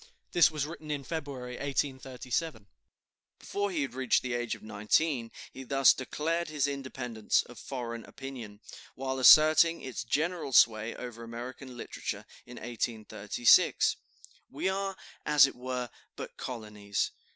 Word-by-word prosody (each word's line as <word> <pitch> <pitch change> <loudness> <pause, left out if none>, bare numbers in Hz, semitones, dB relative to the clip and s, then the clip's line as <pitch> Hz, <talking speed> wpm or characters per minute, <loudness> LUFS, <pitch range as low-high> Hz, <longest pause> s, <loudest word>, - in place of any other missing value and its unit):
(This 175 - +6
was 150 -3 -2
written 155 0 -9
in 145 -2 -2
February, 135 -5 -5
1837.) 135 -1 -3 0.7
Before 205 0 -2
he 165 -6 -1
had 135 - -5
reached 130 -2 +2
the 125 -1 -2
age 120 -1 -2
of - - -16
nineteen 115 +5 0 0.2
he 135 - -8
thus 135 0 +5
declared 165 +6 -2
his 150 -3 0
independence 130 -5 -1
of 120 - -13
foreign 115 -3 -5
opinion, 120 -6 -9 0.3
while 130 0 -3
asserting 155 +5 +7
its 130 -2 -5
general 155 +3 -1
sway 110 -1 +4
over 120 -2 -8
American 125 +2 -8
literature, - - -5 0.2
in 125 - -10
1836: 110 -1 +2 0.5
"We - - -3
are, 195 0 -2 0.3
as 150 -2 +6
it 135 - -4
were, 125 0 -4 0.3
but - - -8
colonies. 105 -4 -3
130 Hz, 135 wpm, -30 LUFS, 120-150 Hz, 0.7 s, asserting